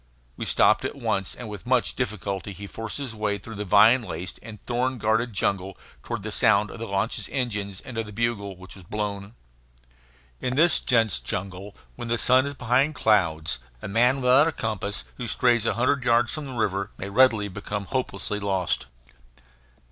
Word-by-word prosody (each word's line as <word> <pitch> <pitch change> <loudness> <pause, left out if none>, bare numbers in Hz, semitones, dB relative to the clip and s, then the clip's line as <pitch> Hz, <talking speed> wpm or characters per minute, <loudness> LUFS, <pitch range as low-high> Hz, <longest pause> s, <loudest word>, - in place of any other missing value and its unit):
We - - -5
stopped - - +4
at - - -3
once, 95 -2 -2
and 120 - -7
with 105 +1 -8
much 125 -4 +2
difficulty 100 -4 -3
he 100 +3 -8
forced 110 +2 -6
his 140 -5 -5
way 105 -2 -1
through 115 +4 -10
the 105 0 -4
vine 110 +6 +6
laced 90 -4 -6
and 110 -2 -10
thorn 125 +1 -1
guarded 110 +2 +1
jungle 95 -1 -1 0.2
toward 115 - -5
the 110 - -4
sound 105 0 +3
of - - -9
the 115 - -4
launch's 100 +3 -1
engines 105 -7 -2
and 130 -4 -6
of 110 - -3
the - - -9
bugle 105 -3 -2
which 95 +1 -11
was 95 - -13
blown. 100 +2 -4 1.0
In 125 0 -2
this 165 +3 +5
dense 115 - +2
jungle, 95 +9 -5 0.2
when 120 -1 -5
the 120 0 +1
sun 130 +3 +4
is 140 - -5
behind 130 +5 +1
clouds, 85 - +2 0.2
a - - -3
man 120 +6 +3
without 130 +4 +5
a - - +1
compass 105 -6 -3
who 120 - -4
strays 120 -1 +2
a - - +1
hundred 130 +2 +1
yards 120 0 +3
from 155 -2 -4
the 130 - -7
river 100 -3 0
may 100 - -5
readily 110 -3 +4
become 100 +1 -5
hopelessly 105 -4 -2
lost. 95 -8 -1
110 Hz, 185 wpm, -25 LUFS, 100-125 Hz, 1.0 s, vine